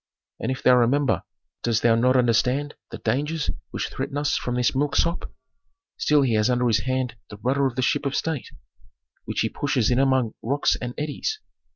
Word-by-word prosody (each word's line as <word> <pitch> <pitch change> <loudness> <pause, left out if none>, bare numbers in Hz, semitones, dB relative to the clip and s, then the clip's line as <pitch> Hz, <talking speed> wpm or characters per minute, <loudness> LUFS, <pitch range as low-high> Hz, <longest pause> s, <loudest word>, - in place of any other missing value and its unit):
And - - -2
if 130 - -5
thou 125 0 +6
remember, 120 -4 +2 0.4
dost 115 -2 0
thou 115 -1 +5
not 125 +3 +3
understand 125 +4 +2 0.2
the - - -7
dangers 150 +3 -1 0.2
which - - -3
threaten 140 - -4
us 145 -1 +1
from 125 - -2
this 125 -1 +2
milksop? 150 +5 0 0.7
Still 150 -2 +3
he 125 -4 +1
has 110 +2 +2
under 125 0 +2
his 110 -2 +2
hand 130 -3 -1
the 105 - -9
rudder 135 +5 +1
of 125 - -5
the 130 - 0
ship 140 - +1
of 135 - -2
state, 160 -5 -2 0.8
which - - -2
he - - +1
pushes 135 -6 0
in 125 - +3
among 130 -4 +2
rocks 140 +5 +1
and 125 0 -5
eddies. 155 - -3
130 Hz, 190 wpm, -24 LUFS, 120-145 Hz, 0.8 s, thou